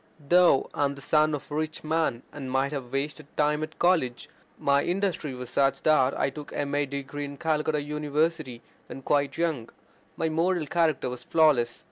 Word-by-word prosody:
Though 175 -6 +5
I - - 0
am 140 0 -2
the - - -11
son 155 +1 +3
of 145 - -9
a - - -3
rich 155 0 -3
man, 155 -6 0
and 135 -3 -6
might 135 +2 0
have 135 -4 -5
wasted 140 +2 -3
time 150 0 +2
at 155 0 -6
college, 160 -9 +1 0.3
my 140 0 +2
industry 175 -6 -1
was 125 -1 -7
such 135 -1 +1
that 145 -4 +3
I - - +1
took 150 +1 -9
my - - -6
M.A. 145 0 0
degree 140 +1 -5
in 140 0 -8
Calcutta 155 -1 0
University 150 -2 -2 0.2
when 135 - -9
quite 145 0 +1
young. 160 -9 -1 0.5
My 160 - 0
moral 165 +1 +1
character 160 -1 +1
was 125 0 -6
flawless. 140 -8 +3
145 Hz, 185 wpm, -27 LUFS, 135-155 Hz, 0.5 s, Though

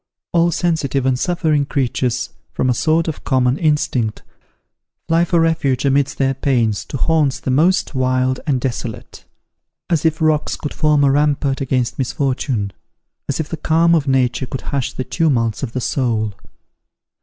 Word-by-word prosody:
All 170 0 +3
sensitive 155 -6 0
and 130 -1 +1
suffering 160 -5 +1
creatures, 130 -2 -1 0.2
from 130 - +1
a - - +2
sort 160 +6 +1
of 160 - -4
common 130 0 +1
instinct, 140 -8 0 0.8
fly 165 +1 +3
for 175 -1 +2
refuge 145 -6 +1
amidst 140 0 +1
their 135 -1 +1
pains 120 -6 0
to - - -5
haunts 150 -3 +1
the 130 - -2
most 165 +7 +2
wild 130 0 +1
and 135 -4 +1
desolate; 120 -3 -5 0.7
as 165 -4 +2
if 160 -1 +1
rocks 155 -1 +1
could 150 - -6
form 150 -2 +2
a 140 - +4
rampart 145 -1 +1
against 130 -2 -1
misfortune 130 -6 -1 0.6
as 140 - -1
if 160 - -2
the 165 - -5
calm 165 +2 +3
of 155 -4 +2
Nature 130 -1 +1
could 130 - -5
hush 140 -3 -2
the 130 - -4
tumults 125 -6 0
of 125 -4 -4
the 130 - -1
soul. 115 -5 -1
135 Hz, 160 wpm, -19 LUFS, 130-155 Hz, 0.8 s, a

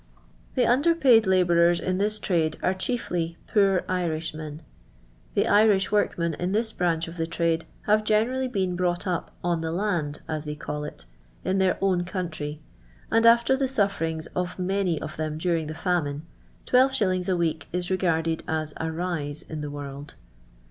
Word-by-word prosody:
The - - +3
under 290 +8 +3
paid 245 -9 +5
labourers 175 -2 +4
in 185 0 -1
this 210 +1 +1
trade 165 -6 0
are 185 - +2
chiefly 180 -5 -2
poor 195 -3 +3
Irishmen. 160 -3 -3 0.7
The - - +2
Irish 205 -2 +4
workmen 170 -5 +1
in 180 +2 -1
this 220 +1 0
branch 170 -4 0
of 165 +1 -9
the 165 0 -1
trade 165 -1 0 0.2
have 215 +1 +3
generally 235 +5 +1
been 190 -7 -1
brought 175 -1 0
up 180 -3 -2
" - - -30
on 170 -2 0
the 160 0 -2
land," 170 -6 -1
as 155 -1 -3
they 150 0 -4
call 150 0 -5
it, 150 - -8 0.4
in 190 +1 +1
their 190 -1 +2
own 185 -2 +2
country, 165 -5 -4 0.5
and 225 +1 +5
after 235 +3 +5
the 270 0 0
suiferiags 195 -10 -1
of 180 0 -2
many 185 -3 0
of - - -7
them 155 -1 -3
during 165 -1 0
the 155 - -5
famine, 160 -5 -1 0.4
12^. 210 -8 +2
a 180 - +1
week 160 -2 -1
is 180 +1 -2
regarded 165 -3 +1
as 155 -1 -2
" - - -9
a 160 0 -2
rise 160 -4 -3
in 155 -1 -6
the 150 - -4
world." 145 0 -8
175 Hz, 175 wpm, -26 LUFS, 160-200 Hz, 0.7 s, paid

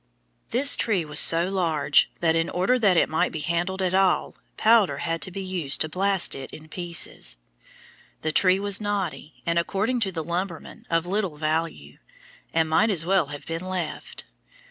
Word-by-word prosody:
This 275 +4 +5
tree 195 -8 0
was 150 -1 +1
so 165 +2 +6
large 160 -6 +2
that, 165 -1 +2
in 165 0 0
order 190 +8 +1
that 195 -6 +3
it - - +4
might 160 - 0
be 155 - -5
handled 175 +4 -2
at 185 0 0
all, 190 -1 +2 0.2
powder 220 -3 +3
had 165 -1 -3
to - - -3
be 195 +2 -6
used 175 -7 0
to 155 - +1
blast 195 +2 0
it 135 -1 -6
in 155 0 -12
pieces. 170 - -3 0.9
The 155 - 0
tree 185 +3 +4
was 200 0 0
knotty, 195 -7 -4
and 170 0 +1
according 210 +8 -1
to 200 -4 -1
the 165 -3 -4
lumbermen, 175 0 -5
of 165 0 +1
little 190 -4 -2
value, 160 +2 -3 0.5
and 160 -1 +1
might 160 +8 +2
as 170 -6 0
well 185 -4 +2
have 145 0 -9
been 165 +1 -5
left. 185 -4 -5
175 Hz, 180 wpm, -24 LUFS, 160-195 Hz, 0.9 s, so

